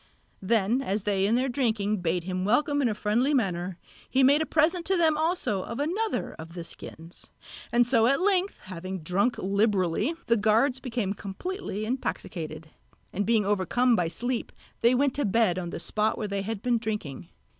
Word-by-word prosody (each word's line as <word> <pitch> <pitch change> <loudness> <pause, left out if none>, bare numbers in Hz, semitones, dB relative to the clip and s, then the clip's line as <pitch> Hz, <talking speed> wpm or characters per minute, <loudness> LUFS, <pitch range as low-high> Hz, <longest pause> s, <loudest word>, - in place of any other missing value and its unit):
Then 225 +4 +2
as 205 -5 -1
they 195 -1 +1
in 225 - +2
their 255 +2 +1
drinking 220 -5 0
bade 175 -1 -1
him 185 +1 -3
welcome 285 +7 +2
in 250 - +2
a 215 - -2
friendly 235 +8 +1
manner, 180 -6 -1 0.3
he 265 +1 +3
made 285 +4 +5
a 315 - -1
present 330 +3 +2
to 380 - +3
them 320 -2 +3
also 315 - 0
of 235 - -6
another 390 +10 -1
of 165 +2 -9
the 170 - -5
skins; 165 0 -11 0.4
and 240 0 +4
so 230 -2 +3
at 275 +2 +3
length 385 0 +1
having 185 0 -6
drunk 200 +9 +1
liberally 200 - +1
the 235 - +3
guards 225 +6 +2
became 235 -7 -2
completely 210 - -5
intoxicated; 165 - -4 0.4
and 205 +1 -1
being 225 -3 +3
overcome 210 +5 +2
by 175 -5 +1
sleep 245 +8 -3 0.3
they 235 +2 +4
went 275 +1 +2
to 290 - -1
bed 205 -3 +2
on 175 -1 -4
the - - -5
spot 215 +1 0
where 215 - -3
they 200 -1 -2
had 210 +1 -5
been 240 -2 +2
drinking. 175 - -5
220 Hz, 185 wpm, -27 LUFS, 190-260 Hz, 0.4 s, made